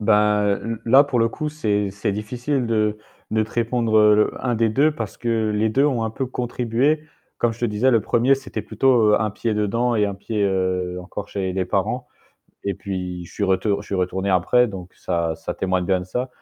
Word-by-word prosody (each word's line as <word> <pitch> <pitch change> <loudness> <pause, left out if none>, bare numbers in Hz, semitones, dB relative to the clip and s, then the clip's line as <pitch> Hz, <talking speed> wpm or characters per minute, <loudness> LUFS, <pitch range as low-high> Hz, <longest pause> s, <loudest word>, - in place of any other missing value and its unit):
Ben 105 -1 +3
l 115 -1 -4
là 135 +5 +7
pour 140 -4 -1
le 115 - +3
coup, 150 +6 -4
c'est 105 -9 -1
c'est 100 +1 -2
difficile 120 +5 -2
de 110 -2 0 0.3
de 110 0 +2
te 110 - -14
répondre, 115 -1 0
heu, 105 0 +5
un 125 -2 0
des 115 0 +2
2 140 +8 +3
parce 115 -8 -6
que 115 -2 0
les 110 +1 +2
2 135 +6 +2
ont 130 -6 +1
un 110 - -2
peu 130 +4 -3
contribué. 125 +5 0 0.3
Comme 120 - +1
je 115 - -14
te - - +1
disais, 115 +4 +2
1er, 120 +5 +3
c'était 130 -5 -6
plutôt 110 0 +3
un 110 0 +1
pied 110 +2 -2
dedans 115 +4 0
et 105 - +3
un 100 - -2
pied 100 0 -1 0.5
encore 100 +3 -7
chez 95 -2 -3
les 95 0 -1
parents. 90 - -1 0.6
Et 100 -1 -1
puis 90 -2 -5
je - - -14
suis 100 - -1
retour 95 +2 +1
je - - -16
suis 100 - -4
retourné 95 +1 -1
après 125 +7 +3
donc 95 -4 -8
ça 85 -2 -2
ça - - -5
témoigne 95 -1 -1
bien 95 -1 +2
de - - -6
ça. 125 +8 -3
110 Hz, 210 wpm, -22 LUFS, 100-120 Hz, 0.6 s, là